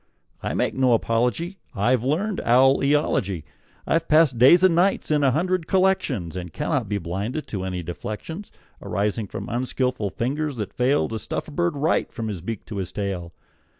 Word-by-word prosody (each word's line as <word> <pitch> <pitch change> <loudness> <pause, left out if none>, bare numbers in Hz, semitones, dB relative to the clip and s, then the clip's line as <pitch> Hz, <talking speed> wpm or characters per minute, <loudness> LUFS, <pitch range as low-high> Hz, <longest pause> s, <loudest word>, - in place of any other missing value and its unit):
I - - -3
make - - 0
no 130 -2 +3
apology; 125 - 0 0.2
I've 120 +4 +2
learned 180 +10 0
owl 130 +3 +5
eology. 125 - +1 0.4
I've 165 0 +1
passed 155 -6 +4
days 170 +9 +7
and 185 -2 +6
nights 180 0 +2
in 150 -1 +3
a 135 - +5
hundred 170 +4 0
collections, 160 - +1
And 90 -2 -5
cannot - - -1
be 105 - 0
blinded 100 - -3
to 95 -3 -3
any 90 -2 -3
deflections 120 - -6 0.3
Arising 105 +2 -1
from - - -6
unskilful 125 -2 -1
fingers 145 +7 -2
that 105 -4 -5
fail 130 +4 +2
To 110 - -4
stuff - - -4
a - - -10
bird 170 0 0
right, 150 +3 +1
from 115 -3 -4
his 95 -5 -5
beak 110 +3 -5
to 105 - -7
his 90 -2 -3
tail. 90 -4 -4
125 Hz, 180 wpm, -24 LUFS, 100-155 Hz, 0.4 s, days